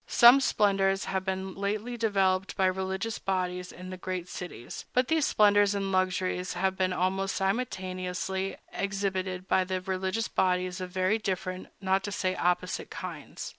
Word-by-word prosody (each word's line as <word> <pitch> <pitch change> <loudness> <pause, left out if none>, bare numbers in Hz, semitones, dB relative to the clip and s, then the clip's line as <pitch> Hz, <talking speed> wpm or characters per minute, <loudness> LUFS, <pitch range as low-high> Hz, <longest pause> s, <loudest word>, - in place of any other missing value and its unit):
Some 245 +3 +8
splendors 195 -4 +2
have 190 -1 -1
been 190 0 -3
lately 210 +5 -2
developed 195 -4 +1
by 190 - +3
religious 190 +4 -1
bodies 180 -1 -2
in 185 +1 -9
the 185 - -6
great 185 -1 -4
cities; 180 -10 -7
but 250 0 +2
these 320 -2 +3
splendors 205 -1 +4
and 195 -1 -1
luxuries 185 -1 0
have 190 +1 0
been 185 -1 +1
almost 190 +2 0
simultaneously 190 -2 -2 0.2
exhibited 190 -2 -2
by 190 - +3
religious 185 +3 -1
bodies 185 0 0
of 185 - -4
very 185 +4 +1
different, 185 -2 -3
not 190 0 +2
to 205 - -4
say 185 -2 0
opposite, 180 0 0
kinds. - - -7
190 Hz, 150 wpm, -29 LUFS, 185-195 Hz, 0.2 s, Some